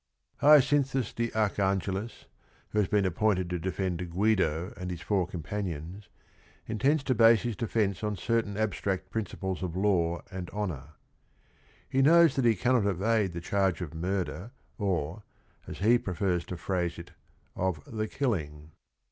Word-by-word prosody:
Hyaci 145 0 +6
nthus 135 -4 -2
de 115 0 -1
Archangelis, 100 0 -1 0.4
who 105 - 0
has 100 - +2
been 105 -2 +2
a 95 - +1
p 85 - -16
poin 110 -2 +4
ted 90 -1 -3
to 90 - -1
defend 95 0 -2
("liiidn 90 -2 0
and 90 -1 -6
his 90 -2 -6
fpn 100 -3 +1
r 90 - -2
compani 90 +1 -4
ons, 90 +6 -10 0.6
inte 110 +4 -1
nds 155 -3 0
to 135 - +1
base 115 -1 +5
his 120 -3 -2
defence 110 -4 -1
on 105 -1 -1
certain 110 +1 -1
abstract 100 -3 -2
princi 110 -4 -4
ples 95 -2 -3
of 90 -2 -4
law 90 -4 +1
and 90 -2 -6
honor. 80 -9 -5 0.9
He 135 - +1
knows 165 +3 +6
that 135 -3 +1
he 115 -2 +5
cannot 120 +1 +2
evade 100 0 +1
the 85 - -5
charge 95 0 0
of 85 -2 -5
murder 90 +4 -3 0.3
or, 90 -2 -1 0.5
as - - -7
he 115 +5 +4
prefers 90 -3 -1
to 90 - -6
phrase 85 -1 -2
it, 85 0 -10 0.4
of 95 -4 -1
the 110 -1 -3
"killing." 80 - -3
100 Hz, 175 wpm, -29 LUFS, 90-110 Hz, 0.9 s, Hyaci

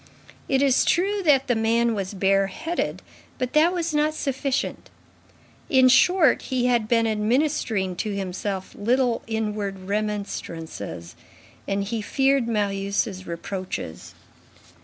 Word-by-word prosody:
It 270 0 +3
is 270 -2 +4
true 395 +4 +1
that 275 -3 +4
the 245 - +1
man 230 +1 +2
was 195 -1 -4
bareheaded, 195 - 0 0.3
but 255 -2 -3
that 315 +3 +5
was 340 -3 -2
not 300 +1 +1
sufficient. 275 -1 -2 0.8
In 260 -1 +6
short, 315 +2 +5
he 255 -2 -1
had 240 -3 +2
been 230 0 +3
administering 220 -3 0
to 210 0 -2
himself 190 0 -4
little 240 +2 +1
inward 210 -3 -3
remonstrances 185 - -4 0.5
and 200 0 0
he 220 +2 -3
feared 270 +3 +1
Marius' 200 -2 -1
reproaches. 170 - -6
225 Hz, 115 wpm, -24 LUFS, 195-270 Hz, 0.8 s, In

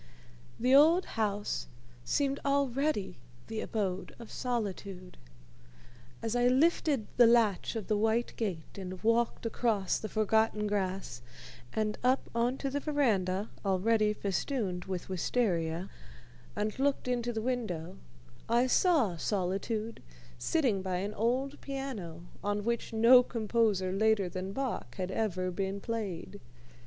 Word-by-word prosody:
The 255 +2 +3
old 320 +6 +6
house 210 -2 -1 0.4
seemed 275 - 0
already 275 - 0 0.3
the 220 -1 -4
abode 195 -4 -3
of 235 -2 -11
Solitude. 200 -6 -4 1.1
As 225 +1 -1
I 245 0 +4
lifted 275 -2 +3
the 240 -1 +8
latch 230 -3 +3
of 220 -3 -3
the 215 - +1
white 225 +3 +1
gate 195 -4 -4
and 185 0 -7
walked 230 +1 +1
across 220 -4 0
the 215 - -5
forgotten 215 0 +2
grass, 190 -10 -2 0.5
and 215 -1 -1
up 255 +2 +2
on 240 +3 +1
to 275 -1 -3
the 285 - -1
veranda 215 - 0
already 210 +2 +2
festooned 200 -2 -2
with 185 -2 -4
wistaria, 180 -3 0 0.7
and 210 +3 -2
looked 275 -1 +1
into 240 -1 0
the 220 - -3
window, 190 -9 -3 0.5
I 240 +2 +4
saw 260 - +3
Solitude 205 +5 -2 0.4
sitting 250 -12 +1
by 185 -1 -2
an 200 +4 -2
old 255 +6 -1
piano, 245 - -5 0.2
on 205 0 -1
which 235 +1 -1
no 230 +3 +7
composer 220 -5 0
later 205 -1 +2
than 185 +2 -4
Bach 265 +3 -3
had 185 -1 -3
ever 185 -3 -1
been 195 +2 -2
played. 200 -3 -4
220 Hz, 130 wpm, -31 LUFS, 190-245 Hz, 1.1 s, the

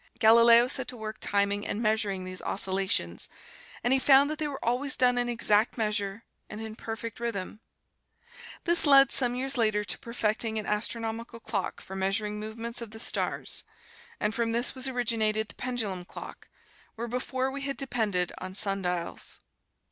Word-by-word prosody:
Galileo 235 +2 +7
set 260 -1 +2
to 250 - -7
work 220 0 -6
timing 200 0 +1
and 205 - -3
measuring 215 -4 0
these 185 0 -6
oscillations, 190 - -1 0.5
and 245 +2 +3
he 265 - +3
found 275 +2 +5
that 310 - -5
they 305 - -1
were 280 -2 -6
always 255 +4 +2
done 250 -1 +3
in 245 0 0
exact 225 -1 +3
measure 210 -1 -2 0.3
and 210 - -7
in 220 -1 -7
perfect 225 0 -6
rhythm. 215 -3 -4 1.0
This 345 -2 +3
led, 275 -2 +7
some 245 -2 +3
years 265 +1 0
later, 215 -3 +2
to 185 - -2
perfecting 225 -1 -1
an 215 - -3
astronomical 230 +2 -3
clock 215 -4 -4
for 190 - -9
measuring 210 +2 -1
movements 230 +2 -4
of 230 - -6
the 220 +1 -11
stars. - - -1 0.6
And 210 +1 0
from 230 0 -1
this 240 +2 +3
was 260 0 -2
originated 220 -4 0
the - - -10
pendulum 225 -8 -3
clock, - - -10 0.5
where 235 +1 -4
before 255 +2 -2
we 280 +1 -6
had 275 0 -3
depended 215 -9 -1
on 185 0 -7
sundials. 180 -4 0
225 Hz, 165 wpm, -28 LUFS, 210-245 Hz, 1.0 s, Galileo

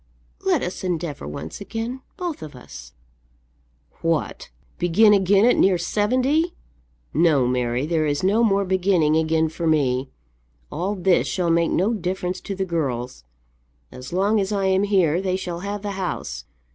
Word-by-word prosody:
"Let 365 -8 +2
us 180 +2 -5
endeavour 165 -5 -3
once 140 - -7
again, 230 +5 -5 0.2
both 350 -4 -4
of 150 -3 -9
us." 125 - -12 1.1
"What, 165 -2 -1 0.3
begin 205 +5 +5
again 200 +1 +4
at 245 - +4
near 190 -2 +4
seventy! 255 - +1 0.6
No, 155 -5 +3
Mary, 125 +1 0
there 155 -1 0
is 145 +2 -1
no 210 +5 +3
more 200 -3 +2
beginning 180 -4 +2
again 160 0 +2
for 165 +1 -4
me. 135 -4 +1 0.6
All 190 +6 -2
this 185 -1 +2
shall 175 -3 0
make 170 0 +2
no 200 +6 +1
difference 185 -2 -3
to 195 - -5
the 190 0 -2
girls. 130 - -3 0.7
As 125 +1 -10
long 200 +4 +2
as 195 +1 -1
I 200 -2 0
am 190 +1 +2
here 185 -4 +2
they 185 -1 -1
shall 180 -2 -4
have 200 +2 -5
the 205 - -3
house. 190 -2 -4
185 Hz, 160 wpm, -23 LUFS, 160-200 Hz, 1.1 s, begin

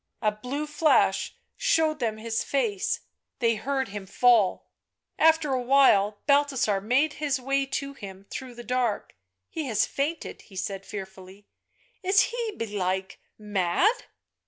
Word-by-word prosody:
A 215 - +3
blue 250 +8 -4
flash 300 +1 +2 0.2
showed 315 -1 +1
them 225 -4 -1
his 225 +1 -2
face... 420 +9 -1 0.4
they 230 -2 +2
heard 265 +3 -2
him 200 -1 -7
fall.... 225 -2 +3 0.5
After 320 -3 +4
a 255 - 0
while 240 -6 +4
Balthasar 280 -8 +2
made 265 +9 +2
his 285 -3 0
way 275 +1 0
to 275 +1 -3
him 195 -6 -10
through 260 -4 -7
the 240 - -9
dark. 245 -4 -1 0.2
" 95 0 -57
He 315 - -3
has 220 -4 +2
fainted," 300 +4 -3
he 195 - -17
said 195 +1 -4
fearfully; 190 0 -9 0.3
" - - -36
is 390 +1 +4
he, 470 -2 -2
belike, 190 -3 -2 0.2
mad 210 - +1
250 Hz, 145 wpm, -26 LUFS, 205-290 Hz, 0.5 s, After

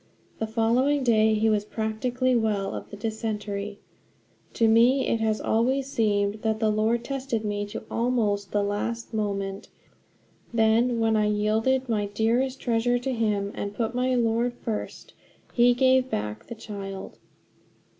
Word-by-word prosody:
The 220 - -1
following 245 +6 +2
day 220 -2 +4
he 220 +1 +2
was 210 -2 +2
practically 240 +4 -1
well 210 -4 0
of - - -7
the 205 - -9
dysentery. 210 -2 -4 0.8
To 225 - +3
me 240 +4 +4
it 230 - 0
has 220 -1 0
always 260 +5 +1
seemed 205 -3 +1
that 220 -1 0
the 220 -1 +2
Lord 220 +2 +1
tested 260 -5 -3
me 205 0 -2
to 205 - -7
almost 220 -4 0
the 205 -1 +1
last 225 +4 -3
moment; 200 -2 -3 0.8
then, 230 +1 +3
when 225 -1 +2
I 210 -1 +2
yielded 220 +5 +1
my 210 -3 0
dearest 235 +6 0
treasure 240 0 +1
to 260 +2 -2
him 210 -4 0
and 200 0 -5
put 230 +1 -1
my 250 +1 +1
Lord 235 +1 +1
first, 225 -3 -5 0.4
he 245 0 +5
gave 260 0 +3
back 105 - -4
the 235 - -7
child. 195 -3 -8
225 Hz, 150 wpm, -26 LUFS, 210-240 Hz, 0.8 s, he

